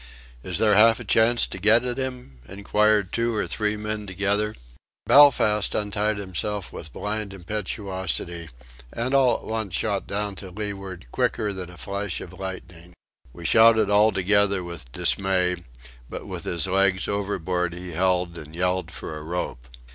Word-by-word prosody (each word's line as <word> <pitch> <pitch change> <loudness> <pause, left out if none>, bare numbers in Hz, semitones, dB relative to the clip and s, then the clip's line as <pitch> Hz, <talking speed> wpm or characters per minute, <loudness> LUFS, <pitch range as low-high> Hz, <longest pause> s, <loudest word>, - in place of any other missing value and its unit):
"Is 90 +5 -2
there 110 -2 +4
half 115 +2 +6
a - - -6
chance 115 +1 +3
to 95 - -7
get 110 +5 +4
at 125 +1 -2
'im?" 125 - -5
inquired 105 0 +1
two 115 0 0
or 105 - 0
three 105 0 -1
men 105 0 -4
together. 100 +3 -1 0.5
Belfast 115 -8 +5
untied 105 0 0
himself 100 +1 -3
with 80 -2 -7
blind 105 -1 -3
impetuosity, 95 - -4 0.4
and 125 +3 -3
all 130 -3 +4
at - - -6
once 110 -5 -3
shot 100 0 -1
down 100 0 -2
to 95 - -8
leeward 95 -4 -6
quicker 105 -2 0
than 90 -2 -5
a 90 - -13
flash 100 -1 -3
of 90 - -9
lightning. 90 -2 -8 0.4
We 85 +5 -11
shouted 110 +2 +5
all 105 +2 +5
together 100 0 +2
with 85 -8 -8
dismay; 90 +1 +1 0.5
but - - -7
with - - -6
his 85 -3 0
legs 95 -1 +2
overboard 90 -4 -2
he 90 0 -7
held 90 0 0
and 75 +1 -11
yelled 90 -1 0
for 80 -1 -7
a 75 - -7
rope. 75 -7 -4
100 Hz, 160 wpm, -24 LUFS, 90-105 Hz, 0.5 s, half